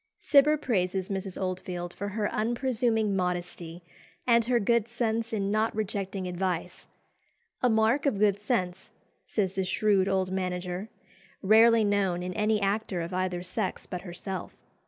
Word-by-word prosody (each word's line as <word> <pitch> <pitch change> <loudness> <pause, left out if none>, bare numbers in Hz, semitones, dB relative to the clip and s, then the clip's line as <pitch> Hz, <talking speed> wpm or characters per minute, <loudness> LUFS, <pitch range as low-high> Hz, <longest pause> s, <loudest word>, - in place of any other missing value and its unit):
Cibber 300 +2 +4
praises 190 -8 -1
Mrs. 195 -1 -4
Oldfield 180 -1 -4
for 200 - -5
her 205 +1 -1
unpresuming 230 -2 0
modesty, 175 -2 -3 0.4
and 235 -2 +4
her 245 0 +2
good 235 +1 +2
sense 230 -1 -1
in 200 -3 -1
not 215 +1 +1
rejecting 195 -3 -3
advice 180 -1 -3 0.7
"A 250 - +4
mark 225 +6 +2
of 235 - +1
good 205 -1 +3
sense," 195 -5 -2 0.3
says 195 -4 -1
the 190 -1 -1
shrewd 195 0 +2
old 190 -1 0
manager, 180 +1 -3 0.5
"rarely 225 +3 +6
known 195 -4 +1
in 180 0 -4
any 215 +1 +1
actor 200 -2 -1
of 170 +2 -5
either 180 -1 -1
sex 185 +2 -3
but 180 - -6
herself. 185 +1 -6
195 Hz, 145 wpm, -28 LUFS, 185-220 Hz, 0.7 s, rarely